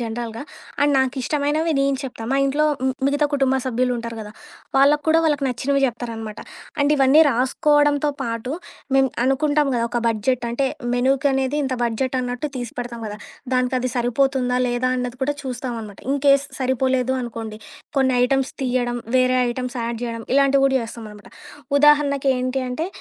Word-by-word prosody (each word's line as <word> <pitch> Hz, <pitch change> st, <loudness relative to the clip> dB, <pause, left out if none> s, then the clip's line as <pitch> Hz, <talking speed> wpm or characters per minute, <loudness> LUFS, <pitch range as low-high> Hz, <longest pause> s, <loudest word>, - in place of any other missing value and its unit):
జనరల్‌గా, 230 Hz, 0 st, -4 dB, 0.4 s
అండ్ 290 Hz, 0 st, +3 dB
నాకిష్టమైనవి 290 Hz, +4 st, 0 dB
నేను 275 Hz, 0 st, +2 dB
చెప్తా, 255 Hz, -4 st, -7 dB
మా 270 Hz, -, +2 dB
ఇంట్లో 285 Hz, +3 st, +1 dB, 0.2 s
మ్ 260 Hz, -, +1 dB
మిగతా 285 Hz, +1 st, +2 dB
కుటుంబ 270 Hz, -2 st, +2 dB
సభ్యులుంటారు 245 Hz, -2 st, -1 dB
గదా, 210 Hz, -1 st, -8 dB, 0.4 s
వాళ్ళకి 285 Hz, +2 st, +4 dB
కూడా 320 Hz, +1 st, +5 dB
వాళ్ళకి 295 Hz, -3 st, +1 dB
నచ్చినవి 270 Hz, +3 st, 0 dB
జెప్తారనమాట. 230 Hz, -3 st, -4 dB, 0.4 s
అండ్ 285 Hz, +1 st, +3 dB
ఇవన్నీ 270 Hz, +2 st, +5 dB
రాసుకోవడంతో 290 Hz, +3 st, +2 dB
పాటు 230 Hz, +1 st, -3 dB, 0.4 s
మేము 270 Hz, 0 st, +4 dB, 0.2 s
అనుకుంటాం 290 Hz, +2 st, +2 dB
గదా 235 Hz, -1 st, +1 dB
ఒక 240 Hz, -, 0 dB
బడ్జెట్ 235 Hz, +3 st, 0 dB
అంటే, 270 Hz, +3 st, 0 dB, 0.3 s
మెనూకనేది 270 Hz, +2 st, +1 dB
ఇంత 265 Hz, -1 st, -1 dB
బడ్జెట్ 250 Hz, +3 st, -1 dB
అన్నట్టు 245 Hz, +3 st, -3 dB
తీసిపెడతాం 240 Hz, -1 st, -6 dB
గదా. 210 Hz, 0 st, -7 dB, 0.4 s
దానికి 255 Hz, 0 st, +1 dB
అది 255 Hz, 0 st, -2 dB
సరిపోతుందా 250 Hz, +1 st, +1 dB
లేదా? 245 Hz, +1 st, 0 dB
అన్నది 250 Hz, 0 st, -3 dB
కూడా 290 Hz, +2 st, -1 dB
చూస్తాం 255 Hz, -1 st, -4 dB
అనమాట, 205 Hz, -2 st, -11 dB
ఇన్‌కేస్ 280 Hz, 0 st, +3 dB
సరిపోలేదు 260 Hz, 0 st, +1 dB
అనుకోండి, 225 Hz, -3 st, -6 dB, 0.4 s
కొన్ని 260 Hz, -1 st, +3 dB
ఐటమ్స్ 270 Hz, +1 st, 0 dB
తీయడం, 245 Hz, -1 st, 0 dB, 0.2 s
వేరే 255 Hz, 0 st, +3 dB
ఐటెమ్స్ 250 Hz, +1 st, -5 dB
యాడ్ 230 Hz, 0 st, -3 dB
జేయడం 230 Hz, -1 st, -4 dB
ఇలాంటివి 275 Hz, 0 st, +4 dB
కూడా 270 Hz, -, +1 dB
జేస్తామనమాట. 220 Hz, -3 st, -9 dB, 0.5 s
ఉదాహరణకేంటి 275 Hz, -3 st, +3 dB
అంటే, 315 Hz, +7 st, -2 dB
260 Hz, 145 wpm, -21 LUFS, 240-275 Hz, 0.5 s, కూడా